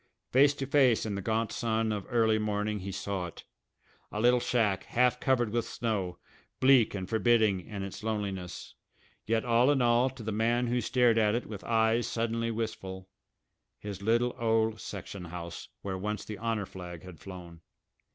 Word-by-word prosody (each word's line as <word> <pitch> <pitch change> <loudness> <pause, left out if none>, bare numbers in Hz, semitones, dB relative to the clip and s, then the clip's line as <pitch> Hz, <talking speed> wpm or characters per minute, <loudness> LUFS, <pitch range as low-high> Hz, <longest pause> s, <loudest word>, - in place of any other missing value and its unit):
Face 140 +2 +5
to 135 - -3
face, 130 -5 +3
in 105 - -2
the 100 - -3
gaunt 110 +2 0
sun 110 -1 0
of 105 -2 -3
early 110 -3 +3
morning 105 0 -1
he 100 +1 -5
saw 95 -1 -3
it 85 - -11 0.7
a 105 - -3
little 125 +2 +5
shack, 110 -6 +1
half 125 +1 +2
covered 120 -5 +1
with 120 +1 +1
snow, 100 -7 -2 0.4
bleak 130 -5 +5
and 95 -2 -4
forbidding 110 -3 +3
in 100 -3 -5
its 95 - -7
loneliness, 100 -5 -4 0.5
yet 110 +1 +1
all 120 +2 +4
in 145 -2 +3
all 120 +1 +4
to 130 -3 -10
the 110 - -3
man 115 +3 +1
who 120 +1 0
stared 120 -1 +3
at 105 0 +3
it 120 - -2
with 105 -3 -8
eyes 115 +1 +2
suddenly 115 0 -1
wistful 95 -5 -5 0.7
his 100 -2 -7
little 120 +3 +2
old 110 -1 +1
section 95 -1 -7
house, 85 0 -7
where 95 -2 -3
once 105 +2 -3
the 105 - -7
honour 115 -3 -1
flag 90 -3 -9
had 90 -3 -11
flown. 90 -3 -10
110 Hz, 175 wpm, -30 LUFS, 100-120 Hz, 0.7 s, Face